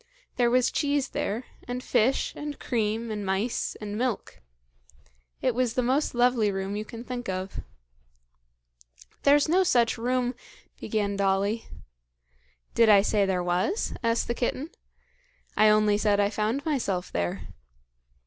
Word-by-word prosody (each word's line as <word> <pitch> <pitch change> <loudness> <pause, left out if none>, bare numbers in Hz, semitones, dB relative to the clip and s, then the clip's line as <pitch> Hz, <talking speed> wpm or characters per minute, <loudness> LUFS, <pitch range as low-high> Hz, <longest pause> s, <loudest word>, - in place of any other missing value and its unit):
There 240 -1 +3
was 250 0 +3
cheese 285 -2 0
there, 220 +5 -2 0.2
and 250 +1 -4
fish, 255 +5 +1
and 295 -1 -6
cream, 225 -1 -1
and 210 -1 -3
mice, 195 +5 -1
and 210 -1 -5
milk. 240 -1 -3 1.0
It - - +2
was 245 -1 0
the 255 - +1
most 260 +3 +1
lovely 240 -3 +3
room 195 +1 -3
you 210 - -3
can 230 +2 -9
think 245 -3 -5
of." 185 +1 -4 1.6
"There's 285 +1 +4
no 365 +4 +4
such 240 -10 +2
room 250 +1 0 0.2
" - - -29
began 205 -3 -1
Dolly. 200 +3 0 1.1
"Did 230 -1 +5
I 200 -2 +7
say 205 -1 +2
there 180 -2 0
was?" 180 - 0
asked 230 0 +1
the 235 - 0
kitten. 260 +6 -2 0.8
"I 215 +1 +5
only 210 -1 +4
said 205 -1 +2
I 205 0 +2
found 220 +7 -1
myself 205 - -1
there. 85 0 -3
230 Hz, 145 wpm, -27 LUFS, 205-250 Hz, 1.6 s, I